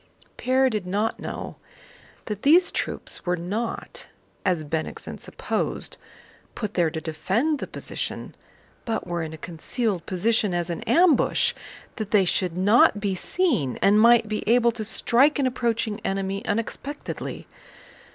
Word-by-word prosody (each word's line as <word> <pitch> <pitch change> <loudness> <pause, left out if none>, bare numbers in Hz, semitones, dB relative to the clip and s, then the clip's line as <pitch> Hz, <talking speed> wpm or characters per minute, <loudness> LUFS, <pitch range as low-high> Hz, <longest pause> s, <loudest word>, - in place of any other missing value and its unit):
Pierre 260 +1 +2
did 215 -7 -2
not 210 +4 -1
know - - -6 0.7
that 210 -1 -5
these 335 +6 +5
troops - - -2
were 180 -1 0
not, 205 +7 -4 0.4
as 175 -4 +1
Bennigsen 155 +1 -4
supposed, - - -2 0.6
put 210 -2 -4
there 170 -3 +2
to 160 - -4
defend 195 - -1
the - - -4
position, - - -5 0.5
but 225 - -2
were 175 -1 -2
in 160 -1 -4
a 160 - -8
concealed 180 - -3
position 205 0 +1
as 175 0 -1
an 170 - -4
ambush, 335 -6 +3 0.4
that 215 -3 -4
they 205 -3 +4
should 180 -1 -1
not 205 +2 +5
be 200 -1 -1
seen 190 - 0
and 210 +2 +5
might 235 -1 +6
be 215 0 -2
able 235 0 +5
to 225 -1 -5
strike 245 +6 +3
an 280 - +1
approaching 230 -3 -1
enemy 195 +1 -2
unexpectedly. 230 +7 -4
210 Hz, 140 wpm, -25 LUFS, 180-235 Hz, 0.7 s, might